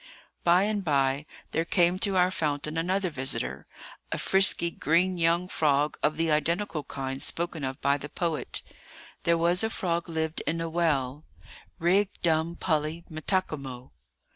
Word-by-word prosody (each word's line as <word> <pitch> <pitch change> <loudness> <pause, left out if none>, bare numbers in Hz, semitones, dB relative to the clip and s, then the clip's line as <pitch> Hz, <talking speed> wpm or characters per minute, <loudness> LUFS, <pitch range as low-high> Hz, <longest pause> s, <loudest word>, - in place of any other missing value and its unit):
By 175 +2 +5
and 205 -1 -1
by 140 -2 +1 0.2
there 165 - +1
came 175 +1 +2
to 195 -1 +2
our 180 0 +4
fountain 150 -2 -2
another 180 +2 0
visitor,—a 130 -4 -4
frisky, 190 -3 +4
green 175 +4 +1
young 170 +2 +2
frog 150 -3 +1
of 155 0 +1
the 165 -1 +1
identical 165 +1 0
kind 135 -1 -5
spoken 170 -3 -1
of 130 0 -3
by 140 +1 +2
the 150 - -7
poet:— 165 -2 -2 0.6
"There 170 0 +4
was 175 +4 +3
a 220 - +1
frog 170 -6 -2
lived 160 -1 -2
in 165 +1 0
a 165 0 -2
well, 150 -4 0 0.5
Rig 190 +4 +3
dum 165 0 +1
pully 155 0 -1
metakimo." 155 -7 -3
165 Hz, 145 wpm, -27 LUFS, 150-175 Hz, 0.6 s, By